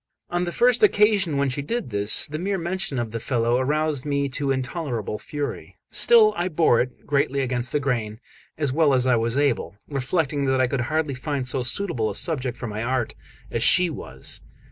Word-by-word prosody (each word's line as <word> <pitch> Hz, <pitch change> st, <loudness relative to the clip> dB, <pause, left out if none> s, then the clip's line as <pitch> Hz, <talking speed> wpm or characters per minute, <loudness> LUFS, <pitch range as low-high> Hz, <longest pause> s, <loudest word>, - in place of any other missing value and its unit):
On 175 Hz, 0 st, 0 dB
the 175 Hz, -, -3 dB
first 245 Hz, +6 st, +3 dB
occasion 205 Hz, -, +4 dB
when 140 Hz, 0 st, +1 dB
she 140 Hz, +2 st, -2 dB
did 220 Hz, -, -3 dB
this, 105 Hz, +1 st, +2 dB
the 155 Hz, +1 st, -5 dB
mere 195 Hz, +2 st, -1 dB
mention 175 Hz, -4 st, -3 dB
of 120 Hz, -2 st, -2 dB
the 115 Hz, -, -3 dB
fellow 120 Hz, 0 st, +1 dB
aroused 150 Hz, +1 st, 0 dB
me 140 Hz, -1 st, -1 dB
to 140 Hz, +1 st, -3 dB
intolerable 130 Hz, -, -2 dB
fury; 145 Hz, -1 st, -5 dB
still 450 Hz, -3 st, +5 dB
I 175 Hz, -, -1 dB
bore 160 Hz, -8 st, +3 dB
it, 125 Hz, 0 st, -6 dB
greatly 140 Hz, -1 st, +1 dB
against 125 Hz, -1 st, -1 dB
the 150 Hz, -, +1 dB
grain, 115 Hz, -6 st, -2 dB, 0.4 s
as 145 Hz, -4 st, -1 dB
well 150 Hz, -2 st, +4 dB
as 125 Hz, -1 st, +2 dB
I 125 Hz, -1 st, +4 dB
was 115 Hz, +2 st, 0 dB
able, 140 Hz, -8 st, 0 dB
reflecting 140 Hz, +1 st, -1 dB
that 130 Hz, -1 st, +1 dB
I 130 Hz, -, +4 dB
could 125 Hz, 0 st, -1 dB
hardly 155 Hz, +3 st, -1 dB
find 135 Hz, +1 st, -3 dB
so 125 Hz, +1 st, -1 dB
suitable 125 Hz, -, -1 dB
a -, -, -5 dB
subject 130 Hz, -7 st, -1 dB
for -, -, -6 dB
my 105 Hz, -1 st, -4 dB
art 125 Hz, 0 st, -1 dB, 0.4 s
as 115 Hz, -, -1 dB
she 180 Hz, +7 st, +5 dB
was. -, -, -5 dB
140 Hz, 200 wpm, -24 LUFS, 125-160 Hz, 0.4 s, still